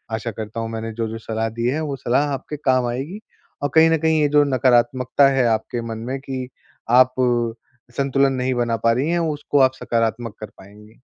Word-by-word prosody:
आशा 110 +1 -4
करता 110 +1 -6
हूँ, 115 - -4
मैंने 115 0 -5
जो-जो 115 0 -4
सलाह 110 0 -3
दी 115 +1 -4
है, 140 +5 0
वो 145 -3 -3
सलाह 130 +4 +1
आपके 140 +3 -6
काम 130 -3 +1
आएगी 135 - -4 0.4
और 145 - +1
कहीं 160 0 +7
न 165 - +3
कहीं, 160 0 +2
ये 150 - +3
जो 145 - +7
नकारात्मकता 130 0 +3
है 135 -2 +2
आपके 115 +1 -1
मन 110 - -4
में 135 - -3
कि, 130 -2 -5 0.4
आप 125 +1 +5 0.8
संतुलन 135 0 +2
नहीं 130 0 -1
बना 115 -1 0
पा 115 - +5
रहीं 135 +6 -1
हैं, 175 - +1
उसको 150 -3 -1
आप - - -23
सकारात्मक 115 -1 -1
कर 110 - -5
पाएँगी। 105 +3 -16
125 Hz, 200 wpm, -21 LUFS, 115-140 Hz, 0.8 s, कहीं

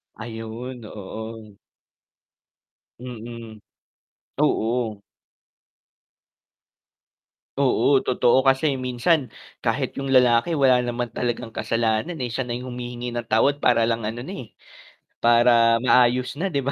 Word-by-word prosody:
Ayun, 115 +2 -7
oo. 110 +1 -9 1.4
Mm, 115 -2 -9 0.8
oo. 110 -2 0 2.6
Oo, 140 0 +2
totoo. 130 +1 +3
Kasi 135 +1 +2
minsan 130 +2 0 0.3
kahit - - -1
yung 135 -1 -2
lalaki 125 +5 +4
wala 135 -4 +4
naman 120 0 -3
talagang 120 -1 -3
kasalanan, 115 +8 -1
eh, 120 - -2
siya 125 +2 -3
na 120 - -4
humihingi 125 0 -6
ng 120 -1 -4
tawad 115 +6 +2
para 120 -4 +3
lang 115 -2 -1
ano 115 +3 -4
na, 140 - -9 0.2
eh, - - -20 0.7
para 115 0 +4
maayos 125 +2 +3
na 190 - 0
'di 140 -7 -2
ba? 140 - -1
120 Hz, 110 wpm, -23 LUFS, 115-130 Hz, 2.6 s, lalaki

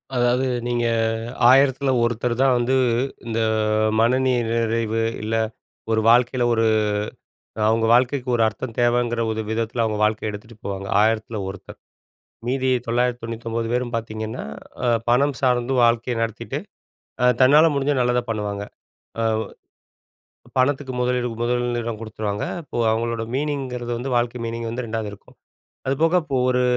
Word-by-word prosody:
அதாவது 125 +1 +2 0.2
நீங்க 120 -1 0 0.6
ஆயிரத்தில 135 +1 +4
ஒருத்தர் 120 +1 0
தான் 135 -2 +4
வந்து 120 +2 +1 0.5
இந்த 115 0 -1 0.6
மன 120 +3 +4
நிறைவு 115 -2 0 0.2
இல்ல, 110 +1 -1 0.6
ஒரு 110 0 +2
வாழ்க்கையில 125 +1 +4
ஒரு 115 0 +2 1.0
அவங்க 115 0 +2
வாழ்க்கைக்கு 125 +2 +2
ஒரு 115 - +2
அர்த்தம் 115 +3 -6
தேவைங்குற 120 0 +2
ஒரு 110 0 -2
விதத்தில 115 +1 -1
அவங்க 110 -1 -1
வாழ்க்கைய 110 0 +1
எடுத்துட்டு 105 +2 -10
போவாங்க. 100 -1 -4 0.2
ஆயிரத்தில 110 0 0
ஒருத்தர். 95 0 -9 0.7
மீதி 130 +1 0 0.2
999 115 -1 -2
பேரும் 125 -1 -1
பார்த்தீங்கன்னா, 110 0 -4 0.4
அ - - +3 0.2
பணம் 140 +4 +3
சார்ந்து 125 -1 +1
வாழ்க்கைய 115 +1 +2
நடத்திட்டு, 115 -2 -3 0.6
ஆ - - +4 0.2
தன்னால 145 +5 +7
முடிஞ்சா 140 +1 +1
நல்லதா 125 0 +2
பண்ணுவாங்க. 105 -2 -3 0.6
ஆ - - +1 1.4
பணத்துக்கு 130 0 +1
முதலீடு 125 0 0
முதலிடம் 120 -2 -1
குடுத்துருவாங்க. 105 -2 -3 0.2
அப்போ 145 - -6
அவங்களோட 115 0 -1
மீனிங்கிறது 130 -4 -2
வந்து, 130 +3 -4
வாழ்க்கை 120 0 0
மீனிங் 115 0 -4
வந்து 120 +2 -4
2வது 110 -1 -3
இருக்கும். 100 - -16 0.5
அது 135 - +1
போக 165 +2 +3
இப்போ 140 -4 -3
ஒரு 125 0 +2
120 Hz, 130 wpm, -22 LUFS, 115-125 Hz, 1.4 s, தன்னால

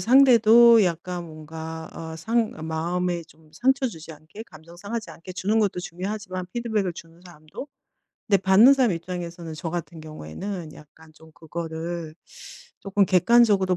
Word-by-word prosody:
상대도 235 -1 +7
약간 175 0 -3
뭔가 160 +1 -8
어 160 -1 -7
상 225 +6 0 0.2
마음에 175 +2 -2
좀 155 -1 -23
상처 265 - +1
주지 160 -5 -10
않게 155 +8 -12
감정 160 -2 -15
상하지 215 +5 -5
않게 180 +2 -10
주는 200 +4 0
것도 200 -4 0
중요하지만 185 +1 -5
피드백을 220 -6 -1
주는 165 0 -13
사람도 155 - -10 0.6
근데 200 -2 +2
받는 210 +8 +7
사람 255 -5 +2
입장에서는 170 -1 -6
저 160 +1 -5
같은 170 -1 -5
경우에는 155 - -7
약간 155 +1 -17
좀 160 0 -18
그거를 165 0 -6 0.7
'쪼금 195 0 +1
객관적으로 195 -1 +4
175 Hz, 325 characters per minute, -24 LUFS, 160-210 Hz, 0.7 s, 상대도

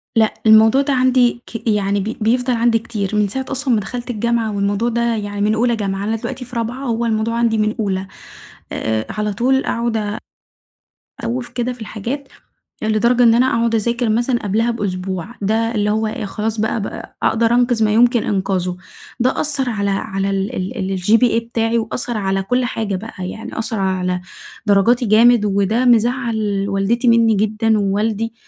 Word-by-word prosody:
لأ 220 -1 +3
الموضوع 220 +4 +6
ده 280 0 0
عندي 250 -2 +3
ك 230 0 -7
يعني 205 -1 +1
ب 220 +5 -4
بيفضل 245 +3 +1
عندي 230 -1 +2
كتير، 210 -4 -4
من 210 -1 +2
ساعة 265 +6 -4
أصلًا 270 -2 0
ما 215 - +3
دخلت 240 +5 -6
الجامعة 230 -1 -1
والموضوع 200 +4 0
ده 235 0 0
يعني 205 -1 -4
من 210 +1 +2
أولى 235 +1 +2
جامعة، 195 -2 -3
أنا 220 +2 -1
دلوقتي 250 +3 -5
في 245 0 -12
رابعة، 240 +4 -3
هوّ 235 -1 -1
الموضوع 225 +1 0
عندي 230 -2 +2
من 215 0 0
أولى، 190 -2 -1 0.6
آآ 110 0 -2
على 210 -1 -2
طول 265 +5 +1
أقعُد 235 -1 -1
آآ 210 0 -3 1.1
أ - - -3
أسوّف 245 +1 -3
كده 250 0 -2
في 245 - -15
الحاجات، 240 +6 -5 0.5
لدرجة 235 +3 +2
إن 230 - +6
أنا 250 +2 +4
أقعُد 230 -2 +1
أذاكر 235 +1 0
مثلًا 240 +2 +1
قبلها 225 +4 +1
بأسبوع، 190 -4 -3
ده 225 +3 0
اللي 210 0 +1
هو 220 +1 0
إيه 215 0 -4
خلاص 215 +2 -3
بقى 220 0 0
ب - - -5 0.2
أقدر 230 +1 +2
أنقِذ 245 -2 +2
ما 210 - +1
يمكن 240 +1 +4
إنقاذُه، 185 -2 -1 0.4
ده 255 +2 +1
أثّر 285 -4 0
على 200 -3 -1
على 195 0 -2
ال 195 +5 -2
ال 190 -1 -3
الGPA 225 +4 +3
بتاعي، 225 0 0
وأثّر 230 +1 -3
على 195 -1 -1
كُلّ 250 +5 0
حاجة 215 -4 -2
بقى، 185 -2 -6
يعني 225 +3 -7
أثّر 220 -1 -3
على 185 -1 -1 0.4
درجاتي 230 +5 +3
جامد، 225 +1 +5
وده 200 +5 +1
مزعّل 230 -4 +1
والدتي 205 +5 0
مني 230 -1 +5
جدًا 215 +1 +1
ووالدي، 210 +3 -1
225 Hz, 180 wpm, -18 LUFS, 205-235 Hz, 1.1 s, الموضوع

